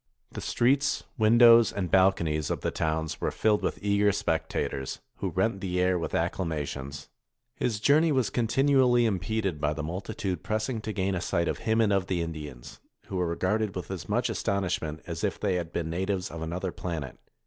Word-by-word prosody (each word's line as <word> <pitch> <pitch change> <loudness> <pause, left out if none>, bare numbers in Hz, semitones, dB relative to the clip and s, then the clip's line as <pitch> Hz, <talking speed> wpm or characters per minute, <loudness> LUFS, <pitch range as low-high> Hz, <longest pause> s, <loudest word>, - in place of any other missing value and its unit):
The - - -6
streets, 135 +4 +1 0.2
windows, 115 +1 +7
and 90 -4 -3
balconies 85 -5 +3
of - - -2
the - - -1
towns 80 0 -2
were - - +1
filled 105 -1 +1
with - - -1
eager 100 0 +3
spectators, 80 -8 -2 0.2
who - - -2
rent 110 -4 0
the 90 -2 -1
air 90 0 +2
with 80 - -3
acclamations. 75 -5 -3 0.5
His 110 -4 -1
journey 155 +7 +4
was 130 -5 +1
continually 125 0 +3
impeded 100 -4 -1
by 75 0 +1
the 75 0 -5
multitude 90 +1 -4
pressing 110 - -2
to 110 - -4
gain 95 -2 -1
a 90 - -2
sight 85 -1 0
of - - -2
him 110 +1 +3
and 110 -3 +3
of 95 -1 +1
the 90 -3 0
Indians, 75 -6 -8 0.3
who 95 - -3
were 90 -1 +1
regarded 95 +5 0
with 90 0 -5
as 95 -3 -6
much - - +1
astonishment 90 -5 -2
as 85 -1 -5
if 100 - -1
they 100 -3 0
had 85 -2 -2
been 80 -1 -3
natives 95 +2 -2
of 80 - -7
another 90 +3 -3
planet. 80 -9 -5
95 Hz, 185 wpm, -28 LUFS, 80-110 Hz, 0.5 s, windows